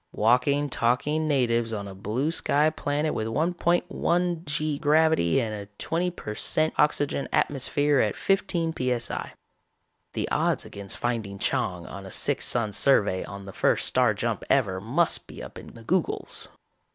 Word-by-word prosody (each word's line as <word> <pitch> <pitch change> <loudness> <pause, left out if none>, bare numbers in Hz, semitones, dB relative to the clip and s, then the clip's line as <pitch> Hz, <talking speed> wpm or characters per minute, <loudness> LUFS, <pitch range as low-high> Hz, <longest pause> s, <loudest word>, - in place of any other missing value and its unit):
Walking, 125 +6 +3
talking 145 +5 +1
natives 120 -5 +1
on 100 -2 -4
a 100 - -8
blue 110 +10 -2
sky 155 -1 +2
planet 150 0 -1
with 110 - -2
1.1 175 - 0
g 150 0 -2
gravity 155 - +3
and 110 -4 -2
a 100 -1 -6
twenty 175 +2 -1
per 140 -11 -7
cent 155 +8 +1
oxygen 145 -1 +1
atmosphere 145 +1 +1
at 105 -4 +1
fifteen 175 -4 +1
p.s.i. 125 -4 -2 0.8
The - - -2
odds - - +1
against 100 -1 -4
finding 110 -5 -2
Chang 90 -2 -1
on 100 0 -8
a - - -10
six - - 0
sun 110 -4 0
survey 105 -7 +3
on 100 0 -9
the 95 - -9
first - - +2
star 125 -4 +3
jump 115 +1 -2
ever 95 -9 +2
must 145 - +1
be - - -9
up - - -9
in - - -13
the 115 - -12
googols. 180 +7 -1
130 Hz, 155 wpm, -26 LUFS, 110-155 Hz, 0.8 s, Walking